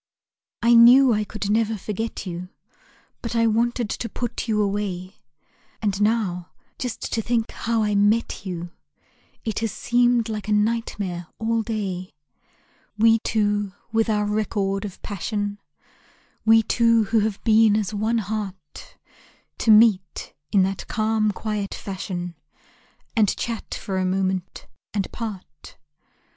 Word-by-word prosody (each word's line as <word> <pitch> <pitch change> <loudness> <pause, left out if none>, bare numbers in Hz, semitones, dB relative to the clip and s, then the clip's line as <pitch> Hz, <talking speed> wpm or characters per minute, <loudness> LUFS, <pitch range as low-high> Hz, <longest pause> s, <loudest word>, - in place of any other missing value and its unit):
I 235 +1 +5
knew 245 +2 +8
I 210 0 +1
could 205 -1 -4
never 220 0 +1
forget 210 +2 -4
you; 180 0 -6 0.7
But 235 0 -4
I 230 0 +3
wanted 235 +1 +1
to 230 - -3
put 240 0 -4
you 215 -2 +1
away. 200 -2 -2 0.6
And 205 -2 -1
now, 205 -5 0 0.3
just 245 -3 -4
to 225 - +1
think 230 0 -1
how 225 -1 -1
I 210 -1 0
met 205 +3 +2
you 175 -3 -5 0.7
It 220 - -1
has 225 -2 -1
seemed 240 0 +2
like 215 -2 -4
a 210 - +1
nightmare 210 -5 -1
all 225 +1 0
day. 195 -5 -4 0.8
We 225 +1 +5
two 205 -3 0 0.2
with 225 0 +1
our 210 -1 +1
record 205 -1 -1
of 195 -2 -8
passion, 205 0 -3 0.9
We 225 0 +6
two 230 0 +3
who 225 +2 +2
have 210 -1 -1
been 220 -2 +5
as 215 -1 -1
one 220 +3 0
heart, 205 -7 -6 0.6
To - - 0
meet 215 -4 +4 0.2
in 195 -2 +4
that 195 0 -3
calm, 215 -1 +1
quiet 210 -1 -3
fashion, 185 -3 -5 0.8
And 215 -3 +3
chat 230 -2 -4
for 190 -2 -3
a 185 - 0
moment 190 0 -2 0.3
and 200 -2 -1
part. 195 - -8
215 Hz, 135 wpm, -23 LUFS, 195-225 Hz, 0.9 s, knew